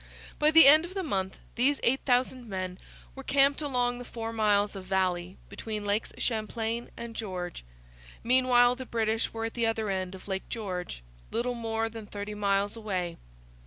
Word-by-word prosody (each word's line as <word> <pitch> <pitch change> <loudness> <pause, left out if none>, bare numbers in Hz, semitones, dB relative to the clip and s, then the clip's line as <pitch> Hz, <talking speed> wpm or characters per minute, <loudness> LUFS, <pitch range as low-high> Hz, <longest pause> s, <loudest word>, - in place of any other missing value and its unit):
By 300 - +5
the 320 -1 +9
end 305 +3 +8
of 355 +3 -8
the 385 - -1
month 190 - -2 0.2
these 275 +4 +2
8,000 250 -1 +1
men 185 -2 -4 0.3
were - - -8
camped 280 +1 +3
along 245 -4 0
the - - -6
four 230 -1 -6
miles 210 -2 +2
of 190 -1 -7
valley 185 -1 0
between 215 -2 -5
Lakes 205 +2 0
Champlain 225 +1 -2
and 235 -1 -7
George. 180 - -5 0.6
Meanwhile 245 0 +4
the 260 -1 -7
British 225 -1 0
were 225 0 -3
at 225 - -4
the 235 -2 +1
other 220 -2 -1
end 190 -1 -3
of 190 - -12
Lake 190 -1 -4
George, 180 - -5 0.3
little 240 +2 -1
more 225 -1 -2
than 225 -1 -8
thirty 205 +1 -6
miles 200 0 0
away. 185 -6 -3
225 Hz, 170 wpm, -29 LUFS, 195-245 Hz, 0.6 s, the